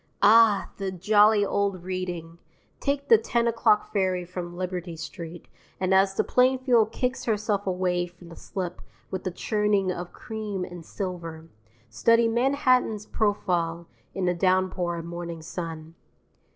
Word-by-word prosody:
Ah, 220 0 +6
the 195 -1 -3
jolly 205 +3 +4
old 200 -3 -1
Reading! 175 -3 -5 0.4
Take 280 0 -1
the 225 -4 +7
10 235 +1 0
o'clock 225 -2 +2
ferry 185 -3 0
from 175 -1 -7
Liberty 180 -2 -4
Street, 165 +1 -8 0.3
and 190 0 +1
as 195 0 +4
the - - +2
Plainfield 250 -3 +3
kicks 255 +1 -2
herself 210 -2 0
away 180 -1 0
from 175 0 -16
the 165 - -11
slip 180 -2 -5 0.3
with 190 0 -4
a - - -1
churning 210 0 +1
of 175 0 -6
cream 210 -5 -5
and 175 -1 -9
silver, 165 -3 -6 0.4
study 230 - +3
Manhattan's 250 -3 +2
profile 175 -6 -1 0.3
in 190 - -1
the 180 - +2
downpour 185 -1 +1
of 165 - -6
morning 170 -1 -6
sun. 165 -1 -6
185 Hz, 140 wpm, -26 LUFS, 175-215 Hz, 0.4 s, the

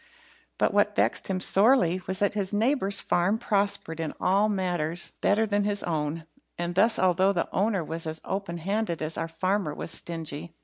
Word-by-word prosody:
But - - +1
what - - +2
vexed - - +1
him 190 -1 -1
sorely 190 -3 +3
was 190 +1 +1
that 205 +1 +1
his 200 -2 -1
next - - +1
neighbour's 220 -5 +2
farm 185 +5 +1
prospered 200 -7 -1
in 160 -2 -3
all 200 +3 +2
matters 175 -4 -2
better 215 +2 +3
than 205 -1 0
his 205 0 -1
own; 155 -1 -2 0.3
and 175 0 -2
this, 220 +5 +4
although 185 +1 +3
the 170 - -1
owner 200 -3 +1
was 165 +1 -5
as 160 0 -4
open 195 -3 -4
handed 190 -1 -2
as 155 +1 -3
our - - -2
farmer 185 -1 -1
was - - -5
stingy. 165 -1 -5
185 Hz, 185 wpm, -27 LUFS, 165-205 Hz, 0.3 s, this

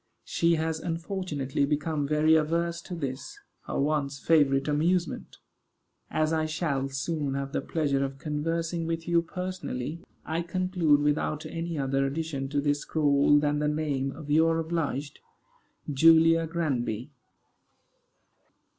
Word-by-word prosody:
She 170 0 +2
has 160 0 -1
unfortunately 165 -5 -2
become 150 0 0
very 155 +2 +3
averse 170 +2 +1
to 180 - -7
this, 140 - -5 0.3
her - - -2
once 140 -1 0
favorite 140 -3 +3
amusement. 165 +4 0 0.7
As 155 +1 +1
I 155 -1 +1
shall 145 -4 -1
soon 140 0 -2
have 140 0 -3
the - - -1
pleasure 140 -4 0
of 135 0 -4
conversing 165 +3 -2
with 165 0 -3
you 170 -1 +3
personally, 170 -5 -5 0.3
I 160 +1 -1
conclude 175 -4 +1
without 150 +1 0
any 165 -1 -4
other 135 0 0
addition 140 -1 -3
to 145 0 0
this 145 0 +1
scrawl 145 -1 +3
than 145 0 +1
the 150 - +1
name 145 -3 -1
of 150 -1 -8
your 165 +2 +4
obliged 160 -4 -2 0.7
JULIA 165 +2 +5
GRANBY. 135 -7 -2
155 Hz, 130 wpm, -28 LUFS, 140-165 Hz, 0.7 s, JULIA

